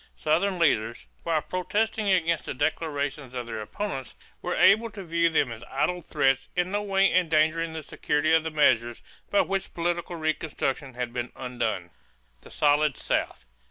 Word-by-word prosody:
Southern 180 +5 +1
leaders, 115 -9 +1 0.2
while 160 -3 0
protesting 210 +5 -1
against 170 -3 +2
the - - -3
declarations 145 -2 -2
of 125 -1 -3
their 110 -2 -5
opponents, 135 - -5 0.3
were - - -2
able 225 +3 +5
to 205 -2 -9
view 170 -1 +2
them 145 -6 +1
as 115 0 -8
idle 175 +6 0
threats 135 -4 +1
in 180 +1 0
no 205 +1 0
way 195 -2 +2
endangering 165 -1 +2
the 160 -1 -5
security 150 +2 0
of 160 -1 +4
the 160 - -2
measures 120 -6 +2 0.3
by 205 - +4
which 195 0 -3
political 175 +1 -2
reconstruction 150 -4 -2
had 125 -1 -3
been 120 0 -3
undone. 110 -8 -3 0.5
=The - - -14
Solid 150 -1 +2
South. - - -2
155 Hz, 160 wpm, -26 LUFS, 135-175 Hz, 0.5 s, able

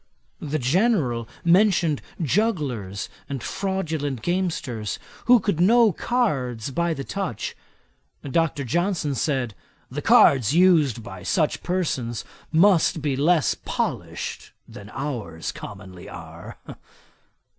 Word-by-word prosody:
The 155 0 -2
General 135 - +1 0.2
mentioned 175 -4 +4 0.2
jugglers 140 - -1 0.2
and 135 -4 -4
fraudulent 160 - -2
gamesters, 160 - -2 0.3
who 245 0 +7
could 200 -5 -1
know 225 +4 +5
cards 140 - -1
by 170 +3 0
the 135 - -5
touch. 185 - -4 0.7
Dr. 145 0 0
Johnson 170 - 0
said, 130 -3 -1 0.4
'the - - -4
cards 130 0 +5
used 160 -10 +4
by 120 - -9
such 160 -6 0
persons 130 - -2 0.3
must 170 -2 +4
be 145 -3 0
less 155 +2 +3
polished - - -4
than 100 0 -11
ours 115 - -4
commonly 95 -3 -10
are.' 85 -1 -10
150 Hz, 105 wpm, -24 LUFS, 120-180 Hz, 0.7 s, who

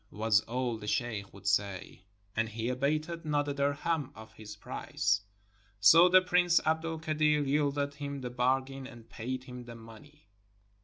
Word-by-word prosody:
was 105 0 +2
all 120 0 -2
the 105 - -8
sheikh 105 -3 -2
would 100 0 -15
say, 100 -2 -1 0.3
and 115 0 0
he 115 +2 -3
abated 155 +6 -1
not 145 -2 0
a 145 - -1
dirhem 145 +1 -1
of 110 0 -12
his 105 -2 -10
price; 100 -1 -1 0.6
so 165 - +7
the 185 +1 +6
Prince 175 -1 +3
Abd 160 +1 +1
el 165 0 -3
Kadir 155 -1 +1
yielded 140 0 0
him 140 -1 -6
the 125 -1 -5
bargain 130 +2 -1
and 120 -4 -13
paid 130 +3 -5
him 125 -2 -9
the 120 -1 -10
money. 115 +6 -15
130 Hz, 165 wpm, -30 LUFS, 115-150 Hz, 0.6 s, so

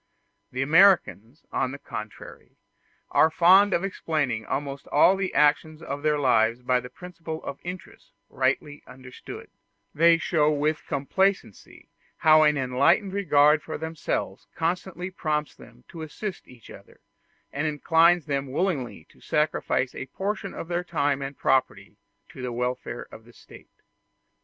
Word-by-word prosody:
The 130 +1 -2
Americans, 160 - +3
on 130 - -1
the 140 - -7
contrary, 110 -6 -10 0.5
are 160 - +4
fond 185 +5 +5
of 170 - 0
explaining 150 - -2
almost 140 0 -4
all 175 +6 +4
the 190 -1 -2
actions 150 +2 +2
of 145 -3 -6
their 150 0 +1
lives 120 -3 +2
by 125 0 +2
the 125 0 -9
principle 165 -2 -8
of 140 - -7
interest 180 0 -9 0.2
rightly 145 -1 -2
understood; 125 0 -11 0.4
they 165 +2 +5
show 155 -2 +1
with 150 +1 -1
complacency 190 - -2 0.3
how 155 0 +5
an 150 -1 +3
enlightened 140 +10 +2
regard 150 -6 +3
for 155 - -6
themselves 160 -1 -4
constantly 180 +2 -3
prompts 150 -4 -2
them 120 0 -17
to 165 - -9
assist 180 +5 -7
each 120 -4 -16
other, - - -16 0.5
and 145 +3 -1
inclines 165 +3 +3
them 140 -3 -3
willingly 150 -5 -2
to - - -24
sacrifice 150 -3 -1
a 130 - -7
portion 195 +6 -4
of - - -7
their 175 +1 -2
time 145 -5 -1
and 135 0 -6
property 130 -1 0 0.3
to - - -11
the 125 -1 -4
welfare 125 0 -4
of 110 - -12
the 120 +1 -19
State. - - -18
150 Hz, 145 wpm, -25 LUFS, 130-170 Hz, 0.5 s, fond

